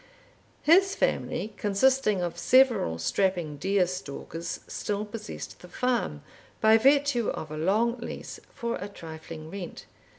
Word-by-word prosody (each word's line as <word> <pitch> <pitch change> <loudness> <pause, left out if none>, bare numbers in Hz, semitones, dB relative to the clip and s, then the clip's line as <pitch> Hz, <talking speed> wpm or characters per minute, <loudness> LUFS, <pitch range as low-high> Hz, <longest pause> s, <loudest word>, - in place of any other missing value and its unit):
His 385 +5 +5
family, 215 - -1
consisting 210 -1 +2
of 170 -1 -2
several 235 - +4
strapping 170 - 0
deer 190 +4 +2
stalkers, 170 -1 -6
still 205 0 -3
possessed 210 0 -7
the 180 - -12
farm, 235 - -1 0.4
by 220 +1 +6
virtue 275 -2 +3
of 155 - -5
a - - -4
long 220 +9 +1
lease, 235 - -7
for 235 0 -3
a 200 - -5
trifling 160 -3 -9
rent. 190 -3 -7
200 Hz, 130 wpm, -28 LUFS, 170-235 Hz, 0.4 s, by